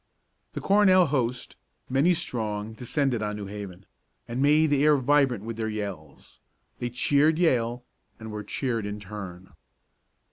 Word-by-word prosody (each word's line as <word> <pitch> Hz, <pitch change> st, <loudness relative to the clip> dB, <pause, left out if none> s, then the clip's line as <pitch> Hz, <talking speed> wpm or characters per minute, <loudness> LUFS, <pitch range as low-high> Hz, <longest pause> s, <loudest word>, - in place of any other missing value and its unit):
The -, -, -5 dB
Cornell 195 Hz, -2 st, +5 dB
host, 125 Hz, -4 st, -2 dB, 0.3 s
many 140 Hz, +7 st, +3 dB
strong, 110 Hz, -6 st, -3 dB
descended 125 Hz, 0 st, -1 dB
on 105 Hz, 0 st, -2 dB
New 105 Hz, -1 st, -6 dB
Haven, 100 Hz, -2 st, -8 dB, 0.4 s
and 120 Hz, +2 st, -3 dB
made 150 Hz, +2 st, +4 dB
the 145 Hz, -1 st, +3 dB
air 150 Hz, -1 st, +5 dB
vibrant 135 Hz, -5 st, +2 dB
with 115 Hz, 0 st, -6 dB
their 110 Hz, -1 st, -2 dB
yells. 100 Hz, -9 st, -7 dB, 0.4 s
They 120 Hz, -, -2 dB
cheered 145 Hz, +5 st, +2 dB
Yale, 125 Hz, -8 st, +1 dB, 0.4 s
and 110 Hz, -1 st, -8 dB
were 105 Hz, 0 st, -5 dB
cheered 115 Hz, -3 st, -2 dB
in 105 Hz, 0 st, -5 dB
turn. 95 Hz, -3 st, -9 dB
120 Hz, 145 wpm, -26 LUFS, 105-145 Hz, 0.4 s, Cornell